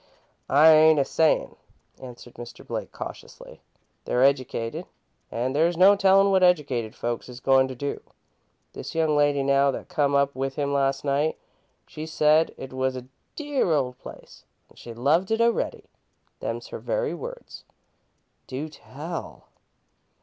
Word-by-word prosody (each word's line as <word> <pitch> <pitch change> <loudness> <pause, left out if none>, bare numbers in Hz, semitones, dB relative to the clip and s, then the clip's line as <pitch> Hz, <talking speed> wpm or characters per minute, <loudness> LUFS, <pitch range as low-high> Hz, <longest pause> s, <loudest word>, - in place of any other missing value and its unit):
"I 150 +4 +7
ain't 155 0 +6
a 140 - +2
sayin'," 160 +2 +1 0.4
answered 125 -1 -11
Mr. 120 0 -11
Blake, - - -5
cautiously. - - -10 0.4
"They're 125 - +1
educated, 130 -4 0 0.4
an' 125 +3 -2
there's 165 +3 +1
no 195 +3 +7
tellin' 195 0 +4
what 190 -1 +3
educated 140 -11 +1
folks 120 +1 -4
is 125 0 -10
goin' 135 0 +3
to 130 - -7
do. 140 +3 -4 0.7
This - - -8
young 160 -2 +1
lady, 145 -1 +2
now, 140 0 +3
that 135 - -5
come 140 -1 +1
up 140 0 +2
with 135 0 -4
him 140 -1 -2
last 135 0 0
night, 145 +3 0 0.5
she 155 +1 -8
said 155 0 +3
it 135 -1 -9
was 130 0 -1
'a 125 0 -10 0.3
dear 290 - -1
old 130 -4 -1
place - - -13 0.3
an' - - -21
she 120 - -11
loved 145 +11 +1
it 225 0 0
a'ready.' 235 0 0 0.5
Them's - - -5
her - - -7
very - - -2
words!" - - -9 0.8
"Do 140 +4 -5
tell!" 155 +3 -9
140 Hz, 150 wpm, -25 LUFS, 130-160 Hz, 0.8 s, I